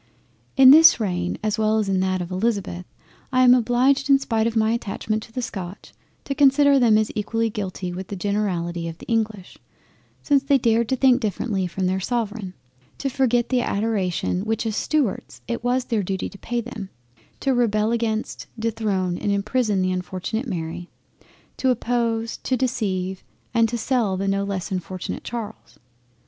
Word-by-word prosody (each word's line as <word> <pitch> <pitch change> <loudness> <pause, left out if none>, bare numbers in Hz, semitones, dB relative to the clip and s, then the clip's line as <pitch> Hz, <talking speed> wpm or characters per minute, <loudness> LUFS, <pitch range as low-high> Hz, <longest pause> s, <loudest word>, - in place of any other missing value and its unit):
In 265 -1 +9
this 320 -2 +8
reign 180 -4 -2
as 215 0 -1
well 215 0 +2
as 215 -2 0
in 190 -1 +1
that 185 -1 0
of 175 - -9
Elizabeth, 185 -3 -2 0.5
I 255 -1 +4
am 250 -1 +8
obliged 255 +3 +2
in 275 - +7
spite 225 -4 0
of 230 - -3
my 220 0 +3
attachment 215 -1 -2
to 225 - -13
the 250 +2 -4
Scotch, 190 -4 -7 0.3
to 280 - -3
consider 280 0 +5
them 225 -4 +5
as 215 0 0
equally 225 +2 -1
guilty 185 -3 -4
with 185 +1 -6
the 200 - -5
generality 180 -4 -2
of 165 -1 -7
the - - -12
English, 220 -5 -2 0.6
since 285 -2 +3
they 275 0 +3
dared 230 -2 +1
to 260 - +2
think 260 0 +4
differently 200 -2 -1
from 185 +2 -3
their 185 +1 0
Sovereign, 210 -3 -3 0.4
to 275 - -2
forget 245 -2 +1
the 255 -2 +2
Adoration 200 -5 -1
which 225 +1 -2
as 220 -2 -2
Stuarts 290 -7 -1
it 235 0 -3
was 250 +1 +1
their 225 -3 0
Duty 190 0 -3
to 200 - -13
pay 240 0 -2
them, 225 -5 -8 0.5
to 270 - +1
rebel 220 -3 +1
against, 225 -2 -2
dethrone 210 -5 -1
and 205 - -1
imprison 205 0 0
the 185 - +1
unfortunate 185 +6 -3
Mary; 175 -2 -5 0.7
to 260 - +1
oppose, 230 -2 0
to 260 - -1
deceive, 195 -7 -2 0.3
and 230 -1 +3
to 235 - -2
sell 225 -5 0
the 195 +1 -2
no 195 0 +1
less 195 -1 -4
unfortunate 185 0 -4
Charles. 230 -3 -7
220 Hz, 175 wpm, -23 LUFS, 190-245 Hz, 0.7 s, In